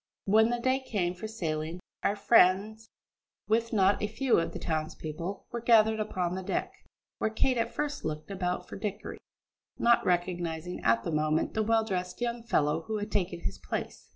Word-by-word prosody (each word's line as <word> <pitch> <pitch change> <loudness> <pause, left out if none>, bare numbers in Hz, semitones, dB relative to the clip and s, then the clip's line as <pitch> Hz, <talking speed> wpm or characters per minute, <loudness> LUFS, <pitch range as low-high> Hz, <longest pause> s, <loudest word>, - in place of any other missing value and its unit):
When 220 +3 +5
the 240 - 0
day 260 +2 +2
came 195 -9 -1
for 200 +5 -6
sailing, 165 -5 -3 0.2
our 200 - +1
friends, 210 +1 +3 0.6
with 225 +1 +1
not 200 -2 +3
a 210 - +1
few 240 +2 +2
of 165 - -2
the - - -6
townspeople, 160 +3 -4
were 235 - -4
gathered 220 -2 +5
upon 185 -5 -1
the 190 - -3
deck, 350 - -2 0.5
where - - +1
Kate 240 +3 +1
at 230 - 0
first 295 -1 -2
looked 155 +4 -4
about 180 -2 -2
for - - -8
Dickory, 210 -1 -5 0.6
not 235 0 +4
recognising 175 -1 -1
at 115 0 +3
the - - -3
moment 155 0 +1
the 220 - +1
well 225 +1 +3
dressed 180 -4 -3
young 240 -1 -2
fellow 155 -9 +1
who 220 - -1
had 205 0 -4
taken 175 -3 -1
his - - -4
place. - - -5
200 Hz, 180 wpm, -29 LUFS, 175-225 Hz, 0.6 s, When